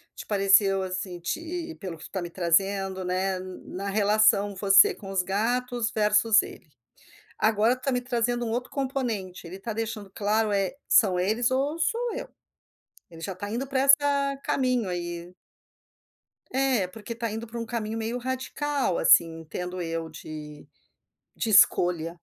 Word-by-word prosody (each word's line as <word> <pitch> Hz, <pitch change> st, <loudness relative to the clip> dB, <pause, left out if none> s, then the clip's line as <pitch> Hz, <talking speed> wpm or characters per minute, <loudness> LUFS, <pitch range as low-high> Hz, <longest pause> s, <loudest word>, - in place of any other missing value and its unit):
te -, -, -8 dB
pareceu 195 Hz, -1 st, +4 dB
assim 185 Hz, -1 st, -5 dB
te, 330 Hz, -, -4 dB
pelo 180 Hz, -5 st, -6 dB
que -, -, -13 dB
tu -, -, -8 dB
está 190 Hz, -, -4 dB
me 175 Hz, -, -5 dB
trazendo, 190 Hz, +2 st, 0 dB
né, 185 Hz, +1 st, -1 dB
na 185 Hz, +1 st, -7 dB
relação 205 Hz, 0 st, +3 dB
você 195 Hz, 0 st, +6 dB
com 195 Hz, -, -11 dB
os 190 Hz, -2 st, 0 dB
gatos 235 Hz, +5 st, -1 dB
versus 215 Hz, +1 st, +4 dB
ele. 165 Hz, -, -12 dB, 0.7 s
Agora 220 Hz, +2 st, +3 dB
tu 255 Hz, -, -14 dB
está 275 Hz, -, -1 dB
me 250 Hz, -1 st, 0 dB
trazendo 240 Hz, -1 st, -1 dB
um 225 Hz, -, -3 dB
outro 245 Hz, +2 st, -3 dB
componente, 245 Hz, -10 st, -3 dB
ele 180 Hz, -, -8 dB
está 215 Hz, +4 st, -5 dB
deixando 220 Hz, -2 st, -4 dB
claro: 215 Hz, 0 st, +1 dB
é, 195 Hz, +5 st, 0 dB
são 195 Hz, -7 st, +4 dB
eles 220 Hz, +7 st, +1 dB
ou 275 Hz, +4 st, 0 dB
sou 470 Hz, +8 st, 0 dB
eu. -, -, -6 dB, 0.8 s
Ele 165 Hz, -, -12 dB
já 195 Hz, +4 st, -4 dB
está 205 Hz, +3 st, -6 dB
indo 250 Hz, +5 st, -3 dB
para 265 Hz, -1 st, -1 dB
essa 280 Hz, 0 st, +3 dB
caminho 255 Hz, -6 st, 0 dB
aí. 175 Hz, 0 st, -5 dB, 1.2 s
É, 260 Hz, -7 st, +1 dB
porque 220 Hz, +5 st, -8 dB
está 230 Hz, -1 st, -4 dB
indo 225 Hz, +2 st, -5 dB
para 235 Hz, +1 st, -7 dB
um 230 Hz, -, -4 dB
caminho 225 Hz, -1 st, -4 dB
meio 225 Hz, +2 st, -3 dB
radical 260 Hz, -, -2 dB
assim, 165 Hz, 0 st, +5 dB
entendo 180 Hz, +3 st, -6 dB
eu 165 Hz, -1 st, -4 dB
de 150 Hz, -1 st, -10 dB, 0.7 s
de 225 Hz, -, -2 dB
escolha. 175 Hz, -5 st, +4 dB
210 Hz, 160 wpm, -26 LUFS, 185-245 Hz, 1.2 s, você